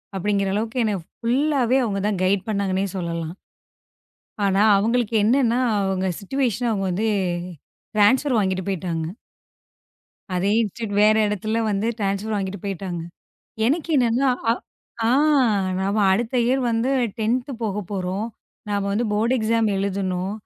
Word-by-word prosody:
அப்படிங்கற 195 0 0
அளவுக்கு 225 +3 -1
என்ன 210 - 0 0.2
ஃபுல்லாவே 265 +1 +2
அவங்க 200 -2 -2
தான் 195 -3 -1
கைடு 190 +1 +2
பண்ணாங்கன்னே 200 -2 0
சொல்லலாம். 170 -1 -4 1.1
ஆனா, 195 0 +2 0.2
அவங்களுக்கு 230 +2 +1
என்னன்னா, 240 +1 +3 0.2
அவங்க 190 -1 0
சிச்சுவேஷன் 245 +1 -1
அவங்க 195 -2 -1
வந்து 210 +5 0 0.9
ட்ரான்ஸ்பர் 250 +5 +4
வாங்கிட்டு 190 -2 -1
போயிட்டாங்க. 175 -4 -2 1.3
அதே 185 +3 +1
இன்ஸ்டிடியூட் 215 -1 -4
வேற 215 0 +5
இடத்துல 210 +2 -2
வந்து 200 +2 0
ட்ரான்ஸ்பர் 200 +2 -1
வாங்கிட்டு 195 -1 -3
போயிட்டாங்க. 190 -3 -4 0.7
எனக்கு 315 +6 0
என்னன்னா 250 +1 +2 0.2
அ, - - +6 0.6
ஆ. - - +3 0.7
நாம 200 +3 0
அடுத்த 230 +5 -1
இயர் 260 +2 +2
வந்து 230 +3 0 0.3
10 245 +5 0
போகப்போறோம். 200 -1 -3 0.4
நாம 200 -1 0
வந்து 220 +4 0
போர்ட் 225 +4 +2
எக்ஸாம் 225 0 +1
எழுதணும். 190 -1 -2
205 Hz, 125 wpm, -23 LUFS, 195-230 Hz, 1.3 s, அ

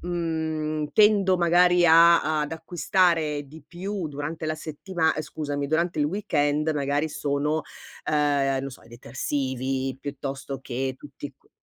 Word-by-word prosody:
mhmm, 160 -3 -2
tendo 205 -3 +5
magari 175 0 +4
a 165 -2 +6
ad 150 - -4
acquistare 160 -2 +1
di 155 +3 -13
più 190 0 -4
durante 150 +2 -5
la 155 - -1
settima 160 +2 -1
ehm, 155 - -2
scusami, 145 -2 -4
durante 160 +2 0
il 145 - +3
weekend 150 -4 0
magari 145 +1 0
sono, 150 +1 -1 0.5
ehm, 145 -2 +2
non 135 - -2
lo 135 - -5
so - - -13
i - - -18
detersivi, 130 +1 -3
piuttosto 135 -1 -5
che 130 0 -3
tutti - - -9
q - - -33
155 Hz, 145 wpm, -25 LUFS, 140-170 Hz, 0.5 s, a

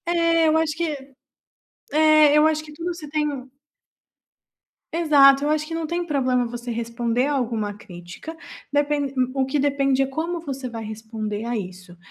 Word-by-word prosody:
É 335 -1 +3
eu 310 - +3
acho 320 -1 +1
que, 340 0 0 1.1
é 310 -1 +5
eu 305 - +5
acho 310 0 0
que 300 - -12
tudo 335 +3 -4
você 310 -3 -9
tem 300 0 0 1.7
exato 285 -4 +5
eu 295 - 0
acho 305 0 0
que 330 - -6
não 330 -1 -2
tem 345 +2 -2
problema 255 -5 +1
você 240 +1 -6
responder 235 +1 -1
alguma 230 -7 -1
crítica, 180 - -10 0.4
depen 290 -1 0 0.2
o 265 - +1
que 270 +3 -1
depende 275 -1 +2
é 270 - +1
como 325 +5 -3
você 270 -5 -5
vai 230 -1 -6
responder 215 -1 -5
a 235 0 -2
isso, 185 -2 -8
275 Hz, 165 wpm, -23 LUFS, 235-310 Hz, 1.7 s, é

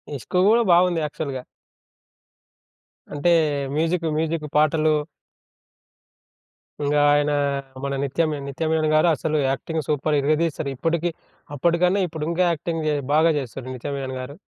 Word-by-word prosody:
ఇస్కు 135 - -2
గూడా 230 +2 +5
బాగుంది 175 -1 +3
యాక్చువల్‌గా. 140 -3 -5 1.7
అంటే, 145 +4 +1 0.5
మ్యూజిక్ 165 +2 0
మ్యూజిక్ 160 0 -1
పాటలు 155 +1 +3 1.9
ఇంగా 145 +1 +2
ఆయన 145 0 +2 0.5
మన 140 0 -2
నిత్యమి 155 +3 0
నిత్య 140 +4 -4
మీనన్‌ 155 -1 +1
గారు 155 +3 +4
అసలు 155 +2 -1
యాక్టింగ్ 155 +4 -2
సూపర్ 150 +1 0
ఇరగదీశారు. 155 0 0
ఇప్పటికి 165 +5 0 0.4
అప్పటికన్నా 175 +6 +2
ఇప్పుడు 160 -2 -5
ఇంకా 170 +2 +1
యాక్టింగ్ 165 0 -3 0.3
బాగా 160 +2 +5
చేస్తున్నారు 130 -1 -6
నిత్య 130 +3 -6
మీనన్‌ 135 -1 -4
గారు. 130 +3 -7
155 Hz, 120 wpm, -23 LUFS, 145-165 Hz, 1.9 s, గూడా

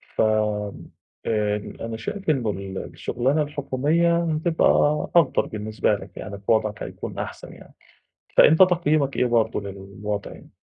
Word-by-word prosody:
ف - - +1
آآ 105 0 -1 0.2
أنا 115 -1 -4
شايف 195 - -5
إن 130 -7 +1
ال 95 -1 -4 0.2
الشغلانة 135 +6 0
الحكومية 150 +4 +1
هتبقى 160 +1 +1 0.5
أفضَل 165 -6 +4
بالنسبة 110 -1 -1
لك 100 - -11
يعني 100 -2 -6
في 100 - -1
وضْعك 110 -1 +1
هيكون - - -7
أحسَن - - -7
يعني، - - -16 0.6
فأنت 160 +3 +7
تقييمك 155 -6 +2
إيه - - +3
برضه 115 -3 +1
للوضع 100 +1 -6
يعني؟ - - -14
115 Hz, 135 wpm, -24 LUFS, 105-155 Hz, 0.6 s, فأنت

